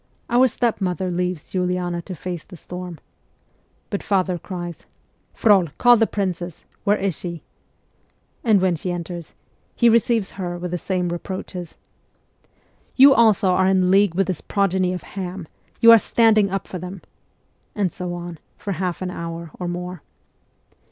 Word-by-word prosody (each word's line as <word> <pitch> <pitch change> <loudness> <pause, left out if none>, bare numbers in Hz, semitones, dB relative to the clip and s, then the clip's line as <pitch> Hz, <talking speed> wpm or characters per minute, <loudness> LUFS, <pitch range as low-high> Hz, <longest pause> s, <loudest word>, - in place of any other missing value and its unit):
Our 250 +2 +6
stepmother 190 -6 -1
leaves 180 -2 -3
Uliana 180 -1 -1
to 185 - -6
face 175 -1 -5
the 180 - -13
storm. 180 -1 -8 0.9
But 200 - -2
father 185 -3 0
cries, 175 -2 -7 0.5
'Frol, 200 -6 +4
call 245 -1 +7
the 225 -1 +3
princess! 180 -4 -3 0.2
Where 205 0 +3
is 195 -4 -1
she? 170 0 -6 0.5
' - - -41
And 215 -5 +4
when 185 -2 +2
she 180 +3 -4
enters, 175 -1 -6 0.4
he 235 - +5
receives 230 -2 +2
her 175 -1 -3
with 175 0 -5
the 180 - -2
same 180 -1 -1
reproaches. 180 0 -6 0.6
' - - -38
You 275 +1 +8
also 220 -5 +4
are 185 +1 +3
in 185 -1 +3
league 195 -2 +4
with 195 +1 +2
this 180 -3 -3
progeny 190 -2 +1
of 180 -2 -5
Ham; 185 -2 -6 0.3
you 230 - +9
are 230 - +9
standing 215 -2 +3
up 195 0 -3
for 185 - -6
them; 180 +1 -8 0.4
' - - -43
and 195 -4 0
so 180 -1 -4
on, 175 -2 -7 0.2
for 200 - -5
half 180 0 -2
an 180 - -3
hour 170 -2 -6
or 180 - -3
more. 180 -1 -5
185 Hz, 165 wpm, -22 LUFS, 175-200 Hz, 0.9 s, you